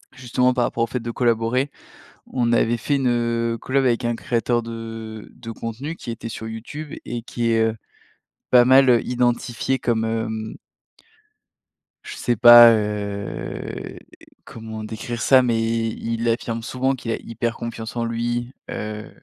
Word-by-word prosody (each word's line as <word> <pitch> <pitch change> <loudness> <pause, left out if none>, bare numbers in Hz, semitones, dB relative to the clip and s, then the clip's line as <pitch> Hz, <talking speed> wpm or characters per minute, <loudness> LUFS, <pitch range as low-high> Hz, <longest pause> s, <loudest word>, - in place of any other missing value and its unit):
justement, 125 0 +1
par 125 -1 +1
rapport 115 - -1
au - - 0
fait 125 +1 -3
de 115 0 -5
collaborer, 120 +3 +1 0.6
on 120 -2 0
avait 120 0 +3
fait 140 +5 0
une, 130 -2 +1
heu, 115 -1 0
collab 135 0 +1
avec 120 0 +1
un 120 0 0
créateur 120 0 0
de 115 -1 -7
de 115 -2 -10
contenu 115 +8 -5
qui 120 - -7
était 115 0 -6
sur 110 0 -6
YouTube 145 +7 -7
et 120 -1 -5
qui 120 0 -2
est, 115 - +3
heu, 110 0 -1 0.8
pas 125 -1 +8
mal, 130 +1 +6
heu, 120 -2 +5
identifié 120 +1 0
comme, 115 -2 0
hem 110 -1 -3 1.5
je - - -8
sais 120 - 0
pas, 120 +1 +10
heu, 105 -1 -4 0.5
comment 110 -1 -8
décrire 110 +1 -5
ça 130 -1 +6
mais 120 -2 +1
i 115 0 -1
il 115 +1 -2
affirme 115 0 -1
souvent 130 +3 -1
qu'il 120 -2 -5
a - - +1
hyper 115 0 -4
confiance 115 -1 -6
en 120 - -1
lui, 120 +2 -2 0.2
heu, 105 0 -5
115 Hz, 160 wpm, -22 LUFS, 115-120 Hz, 1.5 s, pas